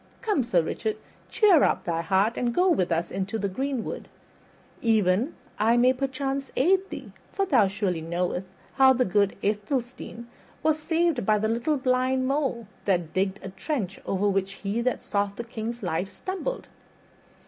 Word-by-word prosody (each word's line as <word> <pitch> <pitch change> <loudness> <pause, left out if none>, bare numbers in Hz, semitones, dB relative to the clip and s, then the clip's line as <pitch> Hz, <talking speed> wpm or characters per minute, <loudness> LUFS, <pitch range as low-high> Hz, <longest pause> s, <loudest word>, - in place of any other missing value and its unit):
Come, 420 - +2
Sir 185 -9 +2
Richard, 215 +6 -2 0.3
cheer 390 -8 +5
up - - +2
thy 165 -1 -1
heart 195 +6 +2
and 240 -1 -1
go 365 +1 +4
with 185 - +1
us 165 +1 0
into 195 +3 -2
the 205 - -1
greenwood. 260 +4 -3 0.7
Even 220 - +2 0.2
I 225 +3 +4
may 250 +2 +5
perchance 270 +1 -3
aid 380 +7 +3
thee, - - -8 0.2
for 395 - 0
thou 250 - +4
surely 190 -4 -1
knowest 180 +3 -2 0.3
how 265 -1 +6
the 255 0 +2
good 200 +1 +2
Athelstane 235 +3 -2 0.4
was 310 0 +2
saved 325 -4 +1
by 215 +2 +3
the 215 +1 0
little 235 +7 0
blind 255 0 +1
mole 270 -4 0 0.2
that 175 -5 0
digged 190 +1 0
a 190 - -5
trench 195 - -3
over 195 +2 +1
which 195 0 0
he 200 +4 -2
that 250 +1 -1
sought 200 -1 -1
the 235 - -5
king's 230 0 -5
life 180 +2 -1
stumbled." 390 - -4
230 Hz, 165 wpm, -26 LUFS, 195-270 Hz, 0.7 s, how